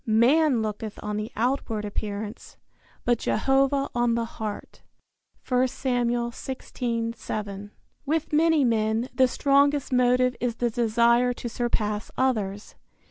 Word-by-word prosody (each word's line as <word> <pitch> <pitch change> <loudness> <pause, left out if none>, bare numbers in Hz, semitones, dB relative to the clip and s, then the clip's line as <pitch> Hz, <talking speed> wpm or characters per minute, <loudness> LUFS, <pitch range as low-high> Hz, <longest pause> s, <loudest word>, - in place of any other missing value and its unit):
"Man 245 +3 +4
looketh 215 0 -5
on 210 0 -3
the 215 +1 -4
outward 230 -3 -1
appearance, 210 +1 -5 0.5
but 240 -1 +2
Jehovah 275 +3 +2
on 240 -1 +2
the 235 0 0
heart." 215 -2 -7 0.7
I 255 +1 +3
Sam. 245 -2 -1
16:7. 230 -4 -4 0.3
With 310 +1 -1
many 320 -1 +4
men 225 +1 +1
the 260 -1 +4
strongest 280 +1 +2
motive 250 0 +3
is 240 -2 -1
the 240 0 -1
desire 235 +2 +3
to 240 - -6
surpass 220 -3 -2
others. 210 -6 -1
240 Hz, 120 wpm, -25 LUFS, 220-260 Hz, 0.7 s, Man